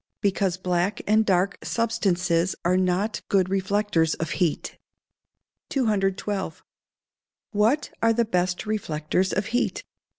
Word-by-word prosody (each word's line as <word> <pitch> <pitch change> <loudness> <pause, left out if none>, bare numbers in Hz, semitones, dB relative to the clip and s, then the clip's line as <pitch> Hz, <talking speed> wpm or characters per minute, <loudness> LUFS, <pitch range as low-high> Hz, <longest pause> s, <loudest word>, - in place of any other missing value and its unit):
_ - - -61
Because 195 -2 +1
black 180 +2 -1
and 215 +1 +4
dark 190 -1 +1
substances 185 -6 +1
are 180 +1 +3
not 185 +3 0
good 190 -2 +3
reflectors 195 -4 +1
of 165 0 -4
heat. 175 -5 -1 0.9
212. 200 - -1 0.9
_What 220 +8 +2
are 230 - +4
the 235 +1 +2
best 180 -2 -1
reflectors 185 -3 -1
of 205 - 0
heat? 245 - 0
195 Hz, 120 wpm, -25 LUFS, 180-210 Hz, 0.9 s, and